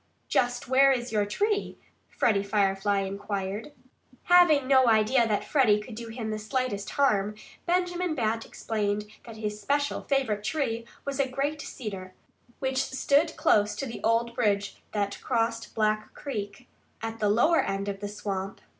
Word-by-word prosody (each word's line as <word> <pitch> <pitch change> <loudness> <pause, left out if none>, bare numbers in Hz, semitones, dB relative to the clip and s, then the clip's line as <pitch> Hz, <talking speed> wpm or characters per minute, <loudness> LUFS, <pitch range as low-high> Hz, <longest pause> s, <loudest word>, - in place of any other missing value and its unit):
"Just 245 0 0
where 270 +2 +5
is 245 -2 -1
your 210 -2 +1
tree?" 410 - -1 0.3
Freddie 205 -4 +2
Firefly 200 0 +1
inquired. 200 +5 -4 0.5
Having 345 -6 +5
no 260 -2 +5
idea 225 +2 +4
that 210 -2 0
Freddie 235 -8 +4
could 215 +3 -9
do 230 +1 -7
him 225 -1 -5
the 215 - -3
slightest 215 -2 -2
harm, 210 -7 +1 0.3
Benjamin 355 -1 0
Bat 225 -3 0
explained 210 -1 -2 0.2
that 230 -2 -10
his 210 -1 -4
special, 285 +6 0
favorite 255 -7 0
tree 230 -2 -1 0.2
was 280 0 -3
a 270 -1 +2
great 285 +3 -2
cedar, 195 -10 -7 0.4
which 265 0 0
stood 285 +5 +1
close 210 0 +3
to 275 - -3
the 235 - -7
old 230 +1 +2
bridge 205 -5 0
that 200 -1 -2
crossed 230 -2 -1
Black 215 -1 0
Creek, 210 -3 -6 0.4
at 225 0 -4
the 210 - +2
lower 245 +11 +4
end 195 +1 -3
of 200 -1 -3
the 205 0 -4
swamp. 195 -2 -4
225 Hz, 155 wpm, -27 LUFS, 205-265 Hz, 0.5 s, where